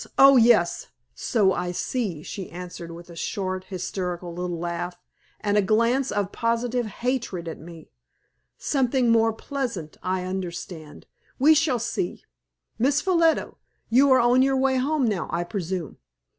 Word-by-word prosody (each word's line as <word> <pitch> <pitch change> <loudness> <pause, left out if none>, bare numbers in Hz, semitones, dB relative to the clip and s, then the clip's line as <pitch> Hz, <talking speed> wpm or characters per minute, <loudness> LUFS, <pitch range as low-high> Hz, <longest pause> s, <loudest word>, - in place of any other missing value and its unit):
Oh, 275 0 +8
yes! 230 -7 +4 0.3
so 200 -5 +2
I 175 - -2
see," 180 - -3
she 190 +2 -6
answered, 175 -1 -8
with 170 +1 -11
a - - -11
short, 185 +2 -3
hysterical 180 -2 -4
little 175 0 -3
laugh, 175 +1 -4 0.4
and 205 0 0
a - - +5
glance 230 +6 +2
of 200 -1 -1
positive 235 +1 -1
hatred 225 -6 -3
at 165 - -6
me. 165 0 -12 0.7
"Something 255 -3 +1
more 225 0 +4
pleasant! 225 - -5
I 185 0 -1
understand; 175 -4 -6 0.3
we 300 +4 +6
shall 300 -4 +2
see. 230 -6 -3 0.6
Miss 275 +5 +3
Ffolliot, 335 -3 +2 0.4
you 270 +4 +5
are 260 - +6
on 245 +1 +4
your 270 0 +3
way 265 0 +2
home 280 +1 +1
now, 200 -8 -1
I 170 - 0
presume. 180 - -4
205 Hz, 145 wpm, -25 LUFS, 175-255 Hz, 0.7 s, Oh